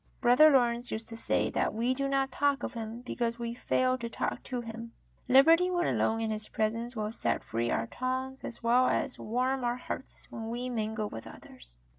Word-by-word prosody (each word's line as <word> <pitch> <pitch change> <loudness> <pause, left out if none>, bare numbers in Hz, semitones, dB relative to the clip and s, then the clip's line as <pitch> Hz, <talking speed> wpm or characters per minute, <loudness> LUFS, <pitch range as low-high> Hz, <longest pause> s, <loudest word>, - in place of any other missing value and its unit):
Brother 250 +5 +7
Lawrence 245 -3 +2
used 220 +1 -4
to 225 - -7
say 225 - 0
that - - 0
we 240 +3 +1
do 275 +1 -1
not 270 -1 +1
talk 285 +1 +1
of - - -3
Him 230 0 -6
because 235 -2 -2
w^e 235 -1 -4
fail 255 +1 +1
to 235 0 -4
talk - - -3
to 250 -2 -3
Him. 230 0 -8 0.3
Liberty 325 +8 +6
when 350 -1 +1
alone 225 0 +1
in 220 -1 -1
His 215 0 -3
presence 230 +3 -2
will 215 -1 -2
set 230 - -1
free 115 +1 -2
our 115 - 0
tongues 260 - -3
as 235 - -7
well 245 +2 +4
as 275 -3 -1
warm 255 +4 -1
our 240 0 0
hearts 255 - -7
when 225 0 -5
we 245 +2 -3
mingle 220 -2 -2
with 115 - -8
others. - - -13
240 Hz, 205 wpm, -30 LUFS, 225-255 Hz, 0.3 s, Brother